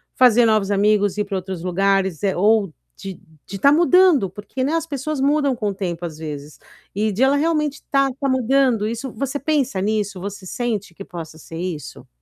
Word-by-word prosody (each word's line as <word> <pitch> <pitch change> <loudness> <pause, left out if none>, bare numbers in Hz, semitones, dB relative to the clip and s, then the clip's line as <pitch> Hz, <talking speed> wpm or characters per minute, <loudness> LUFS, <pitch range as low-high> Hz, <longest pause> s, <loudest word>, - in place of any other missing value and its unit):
fazer 245 -2 +5
novos 215 -2 +2
amigos, 205 0 +2
ir 210 - 0
para 200 -1 -3
outros 185 -2 -6
lugares, 190 -1 0
eh, 195 - +1
ou 205 -3 +2 0.2
de 195 -2 -8 0.3
de 195 - -6
estar 280 +8 +5
mudando? 345 - +4
Por 205 +1 -10
que, 260 0 -3
né, 290 +4 0
as 330 0 -1
pessoas 285 0 -3
mudam 285 -2 +2
com 215 -3 -2
o - - -3
tempo 175 -3 -4
às 155 -2 -7
vezes. 150 -2 -8 0.4
E 215 +1 0
de 210 +6 -3
ela 275 +2 +4
realmente 300 -2 0
estar 275 -1 +1
estar 275 +1 -3
mudando 255 -3 +2
isso 235 +3 -4
você 275 +4 -3
pensa 275 -8 0
nisso, 205 -2 -1
você 200 -1 -7
sente 220 -7 -3
que 195 - -9
possa 165 -3 -9
ser 165 +1 -10
isso? 175 -4 -6
215 Hz, 200 wpm, -21 LUFS, 190-270 Hz, 0.4 s, fazer